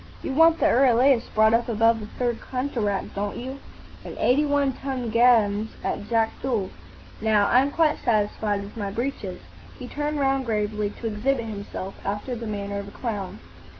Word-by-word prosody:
"You - - -3
want 325 +3 +5
the - - +2
Euryalus 255 0 +4
brought 220 +1 +5
up 235 +1 +2
above 225 0 +3
the 210 - -7
Third 240 +1 -2
Cataract, 240 -7 -2
don't 200 +1 -3
you? 260 +3 -6 0.4
and - - -8
eighty 290 +4 +3
one 285 -2 +2
ton 255 -3 -4
guns 220 -3 +4
at 205 - -3
Jakdul? 225 -2 0 0.5
Now, 215 -2 +3
I'm 260 +3 +4
quite 315 +1 +2
satisfied 210 -3 0
with 200 - -11
my 205 -3 -3
breeches." 210 -4 -4 0.4
He 250 - -8
turned 295 +2 -3
round 270 -2 +1
gravely 210 -1 -1
to 220 - -10
exhibit 230 +3 0
himself, 200 -3 -6
after 205 +5 -3
the 230 -1 -6
manner 200 -1 -3
of 200 - -7
a - - -10
clown. 205 -6 -4
230 Hz, 170 wpm, -25 LUFS, 210-265 Hz, 0.5 s, want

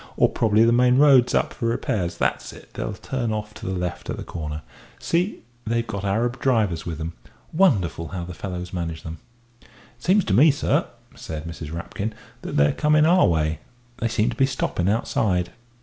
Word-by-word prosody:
Or - - +5
probably 110 0 +3
the 115 - +4
main 125 +1 +4
road's 135 -4 +6
up - - +1
for 120 -2 -2
repairs. 95 -6 -1
That's - - -1
it - - -15
they'll - - -4
turn 125 -4 -3
off 105 0 -4
to 110 - -8
the 95 - -1
left 90 -1 -4
at - - -3
the - - -5
corner. 75 -2 -6 0.3
See, 180 +5 -1 0.2
they've 115 +1 0
got 100 -3 -5
Arab 115 +6 0
drivers 105 -12 +1
with 80 -3 -4
them. 80 +1 -5 0.4
Wonderful 100 - +2
how 90 0 -5
the 90 +1 -7
fellows 90 0 -6
manage 85 -3 -4
them." 80 0 -7 0.4
"It - - -22 0.3
seems 185 +9 +3
to 95 - 0
me, 140 +10 +7
sir," 145 - +1 0.3
said 80 0 -7
Mrs. 80 -2 -7
Rapkin, 100 +6 -4 0.3
"that - - -4
they're 70 0 +4
coming 150 0 +3
our 180 +3 +5
way 80 -1 0 0.4
they 115 - -1
seem 115 +1 +1
to - - -6
be 135 +2 +3
stopping 95 -8 -1
outside." 95 -4 0
105 Hz, 195 wpm, -23 LUFS, 85-125 Hz, 0.4 s, me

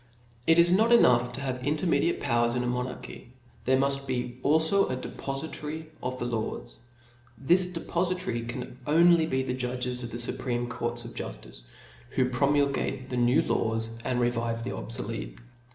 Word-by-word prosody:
It 165 - +6
is 170 +1 +6
not 220 +6 +4
enough 125 - +5
to 140 - -5
have 130 -2 -3
intermediate 165 +4 +1
powers 120 0 +1
in 125 - 0
a - - -2
monarchy, 125 0 -5 0.3
there 130 +1 +4
muft 140 0 0
be 125 -1 -3
alfo 160 +7 +3
a 130 - -1
depofitary 150 +4 -5
of 130 0 -3
the 120 - -3
laws. 115 -2 -4 0.6
This 175 +9 +3
depofitary 175 -8 -2
can 125 +1 -6
only 165 +1 +5
be 130 -3 0
the 125 - -2
judges 125 0 -2
of 120 - -4
the 120 - -5
fupreme 120 0 -2
courts 120 0 -3
of 115 - -8
juftice, - - -7 0.5
whopromulge 135 0 +1
the 125 - -2
new 120 +4 +4
laws, 115 0 -1
and 125 -2 0
revive 115 -1 0
the - - -4
obfolete. - - -2
130 Hz, 155 wpm, -28 LUFS, 120-150 Hz, 0.6 s, It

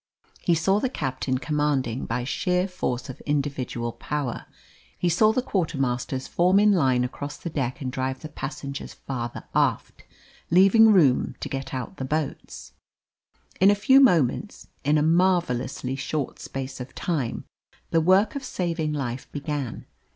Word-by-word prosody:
He 175 - +2
saw 190 +5 +2
the 260 - 0
captain 130 - -2
commanding 140 -4 -1
by 120 +2 -2
sheer 180 +8 0
force 180 -10 -3
of 130 - -9
individual 135 -5 -2
power; 140 -1 -4 0.5
he 175 - +1
saw 215 +6 +4
the 245 +3 0
quartermasters 135 - -1
form 180 +3 +3
in 210 0 +5
line 130 -9 +3
across 145 +3 -5
the 170 - -6
deck 130 -4 -2
and 130 -2 -3
drive 130 0 -3
the 155 - -7
passengers 140 -1 -6
farther 120 -3 -5
aft, - - 0 0.5
leaving 195 +6 +6
room 150 -11 +3
to - - -4
get 135 0 -5
out 130 -2 -5
the - - -4
boats. 155 +2 -4 0.9
In 195 - +6
a 205 - +5
few 265 +7 +5
moments 180 - +2
in 150 +2 +3
a 150 - +2
marvellously 160 -7 +1
short 140 +1 -3
space 135 0 -6
of 125 +1 -8
time 145 -10 -2 0.5
the 165 - +3
work 190 +6 +4
of 280 - -4
saving 170 -9 -2
life 130 -3 -4
began. 145 -4 -4
145 Hz, 150 wpm, -25 LUFS, 130-180 Hz, 0.9 s, leaving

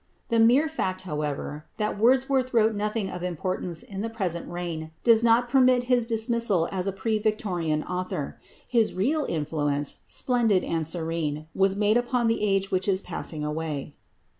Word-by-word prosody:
The 230 -1 +2
mere 245 +7 +5
fact, 190 -12 -2
however, 150 -2 -4
that 210 0 -1
Wordsworth 255 +2 +2
wrote 220 -1 +4
nothing 210 0 -2
of 180 - -6
importance 180 -1 -3
in 195 -1 -6
the 225 - -2
present 185 -7 -3
reign 170 -2 -4
does 230 -1 +5
not 235 +1 +4
permit 255 0 +4
of - - -13
his 245 -2 +3
dismissal 225 -6 +2
as 185 0 -2
a - - +1
pre 215 +3 -1
Victorian 180 -8 -1
author. 180 0 -4 0.3
His 230 -3 +2
real 280 +11 +1
influence, 145 -2 -1
splendid 230 -7 +2
and 165 -2 -1
serene, 160 -2 -3
was 195 0 +2
made 210 +2 +3
upon 245 0 0
the 225 0 +1
age 195 -2 +1
which 185 +1 0
is 190 -1 +2
passing 160 -4 -4
away. 150 -2 -4
195 Hz, 165 wpm, -26 LUFS, 165-230 Hz, 0.3 s, mere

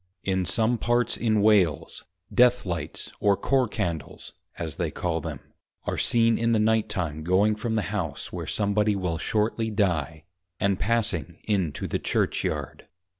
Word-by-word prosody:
In 95 -1 0
some 110 +5 +1
parts 120 0 +1
in 110 -3 +1
Wales 95 -9 +2 0.3
Death 125 -1 +4
lights 85 -3 -4
or 100 -1 +3
Corps 130 +5 +2
Candles 85 -10 -4 0.2
(as 80 -4 -5
they - - -1
call - - -2
them) - - -5 0.5
are - - -1
seen 115 -1 +3
in 115 0 +2
the 110 - +3
night 110 0 +2
time 80 -6 -3
going 95 +5 +3
from 110 +2 -2
the 110 - +1
House 85 -8 -4
where - - -5
some 100 -1 0
body 105 0 +2
will 90 -4 -2
shortly 110 +3 0
die, 85 -7 0 0.4
and 100 -1 +1
passing 100 - 0
in 95 -7 0
to - - -5
the - - -2
Church - - 0
yard. - - -4
105 Hz, 170 wpm, -26 LUFS, 90-110 Hz, 0.5 s, Death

